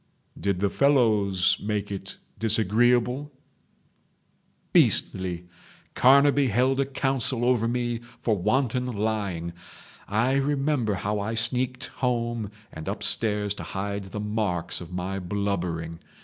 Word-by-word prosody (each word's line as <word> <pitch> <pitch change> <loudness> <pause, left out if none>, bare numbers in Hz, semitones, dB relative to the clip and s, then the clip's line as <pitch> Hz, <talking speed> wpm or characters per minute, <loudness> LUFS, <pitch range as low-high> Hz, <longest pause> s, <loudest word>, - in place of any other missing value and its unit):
"Did 100 -2 -1
the 100 - +2
fellows—make 105 -6 +2
it 95 0 -6 0.2
disagreeable?" 120 +5 +2 1.4
"Beastly..... 90 -2 +2 0.5
Carnaby 140 +1 +5
held 130 +4 +2
a 140 - +1
council 135 -3 0
over 120 -2 +2
me 120 -1 -1 0.2
for 110 - +2
wanton 125 +5 0
lying. 100 -7 -2 0.5
I 120 +6 +1
remember 140 -5 0
how 105 +2 -2
I 110 +3 -2
sneaked 125 +2 0
home 120 -4 -1 0.2
and 80 0 -8
upstairs 105 -2 +1
to - - -8
hide 100 0 -4
the 95 +2 -6
marks 105 -6 -1
of 85 - -9
my 90 +2 -3
blubbering. 90 -4 -3
110 Hz, 110 wpm, -26 LUFS, 100-125 Hz, 1.4 s, Carnaby